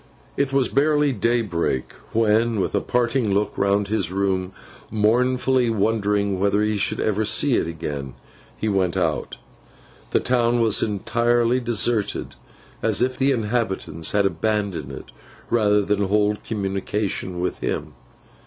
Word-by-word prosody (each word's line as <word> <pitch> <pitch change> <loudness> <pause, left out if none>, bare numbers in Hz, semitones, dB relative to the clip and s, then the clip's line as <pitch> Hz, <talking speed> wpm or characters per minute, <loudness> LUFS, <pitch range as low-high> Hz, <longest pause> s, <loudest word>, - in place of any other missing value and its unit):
It 140 -1 0
was 135 -2 +2
barely 150 +1 +2
daybreak, 105 - -1 0.2
when, 115 0 +2
with - - -1
a - - +1
parting 120 -4 0
look 105 +1 0
round 100 +1 +1
his 100 -5 0
room, 95 -1 -1 0.4
mournfully 125 +3 +2
wondering 105 -2 0
whether 100 +2 +2
he 105 0 0
should 100 - 0
ever 110 0 0
see 130 +6 +3
it 80 - +1
again, 75 -5 -5 0.4
he 110 - -2
went 95 -3 0
out. 85 -4 -1 0.7
The - - +2
town 120 -1 +1
was 110 -3 +3
as - - +1
entirely 120 +4 +1
deserted 115 -3 -1 0.5
as - - +2
if 130 0 0
the 135 +1 +1
inhabitants 110 - -1
had 100 -1 +2
abandoned 100 -8 -1
it, 65 - -10 0.4
rather 105 -3 +3
than 100 0 0
hold 105 +1 +1
communication 100 -2 -3
with 90 - -2
him. - - -3
105 Hz, 140 wpm, -22 LUFS, 95-120 Hz, 0.7 s, see